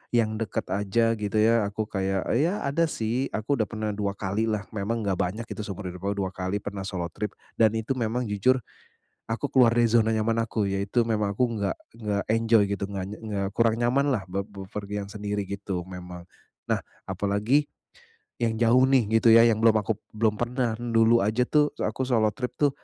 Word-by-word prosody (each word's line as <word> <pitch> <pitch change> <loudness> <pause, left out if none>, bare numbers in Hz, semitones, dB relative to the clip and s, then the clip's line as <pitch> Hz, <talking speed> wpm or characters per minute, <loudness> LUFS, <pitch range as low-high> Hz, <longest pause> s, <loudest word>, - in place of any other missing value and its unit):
yang 110 -2 +1
dekat 110 -4 -2
aja 105 +3 +1
gitu 105 0 -3
ya, 110 0 +4
aku 105 +2 -3
kayak 95 -1 -1 0.2
ya 175 +8 0
ada 160 +4 +1
sih, 120 0 -1
aku 120 +5 -1
udah 110 - +1
pernah 110 -1 -3
2 100 -1 -2
kalilah. 105 +2 -1
Memang 110 +2 -2
nggak 95 -3 0
banyak 105 +6 -1
gitu 110 - -8
seumur 100 -3 -5
hidup 90 +2 -6
aku 100 - 0
2 95 - -3
kali 95 +1 -3
pernah 100 -1 -5
solo 90 -3 -4
trip, 105 +4 -5 0.2
dan 110 -1 +4
itu 110 +3 -3
memang 120 +2 -1
jujur, 105 +3 +2 0.7
aku 115 +5 -3
keluar 125 -4 +5
dari 120 0 +3
zona 110 -1 +3
nyaman 115 +1 +1
aku, 110 -2 -1
yaitu 100 +4 0
memang 105 -3 0
aku 125 +5 +1
enggak 100 -5 -2 0.2
enggak 105 -3 -2
enjoy 115 0 +4
gitu, 100 0 -3
nggak 95 -2 -3
ny 105 - -6
nggak 100 -3 -2
kurang 115 -1 +3
nyamanlah 120 -3 +1
be 95 +2 -2
bepergian 100 0 -6
sendiri 105 -1 -4
gitu 100 -1 -4
memang. 90 -1 -9 0.4
Nah, - - 0 0.2
apalagi 105 +9 +1 0.7
yang 115 -2 0
jauh 120 +3 +5
nih 120 -5 +3
gitu 115 0 +5
ya, 115 +1 +8
yang 110 - +2
belum 110 -1 +5
aku 105 0 -2 0.2
belum 110 -1 +1
pernah. 120 -1 -1
Dulu 115 -2 +3
aja 110 +4 +1
tuh 150 -1 +3
se - - -9
aku 130 - -3
solo 115 -4 +2
trip 125 +3 -5
tuh, 145 +2 +2
110 Hz, 195 wpm, -26 LUFS, 100-115 Hz, 0.7 s, ya